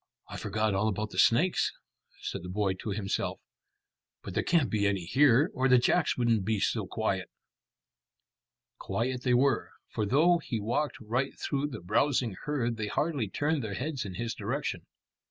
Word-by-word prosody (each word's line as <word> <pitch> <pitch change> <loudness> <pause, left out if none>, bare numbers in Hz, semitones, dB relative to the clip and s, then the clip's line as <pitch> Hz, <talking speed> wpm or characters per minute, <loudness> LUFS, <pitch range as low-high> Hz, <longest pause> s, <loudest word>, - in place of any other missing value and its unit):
"I - - -8
forgot 110 0 -1
all 95 +3 +1
about 105 0 -2
the 90 - -3
snakes," 160 - +4 0.5
said - - -4
the 90 - -8
boy 100 0 0
to 95 +4 -7
himself; 100 -1 -2 0.8
"but - - -7
there - - +1
can't 165 -7 +2
be 105 -2 +2
any 95 -4 -1
here, 135 - +4
or 130 0 +1
the 125 -1 +6
jacks 150 +6 +2
wouldn't 115 -4 +2
be 110 +1 0
so - - 0
quiet." - - -2 1.5
Quiet 125 +2 -2
they 125 -1 +2
were, 135 +2 +2 0.2
for 105 - -1
though 165 - +4
he 115 -8 -3
walked 120 +8 -1
right 125 +5 -2
through 140 0 -1
the 140 - -7
browsing 120 +3 +1
herd 120 -6 -1
they 110 -2 -2
hardly 140 - -1
turned 145 +4 0
their 100 -3 -4
heads 140 +3 -3
in 95 -3 -7
his 115 +3 -3
direction. - - -3
120 Hz, 170 wpm, -29 LUFS, 105-140 Hz, 1.5 s, the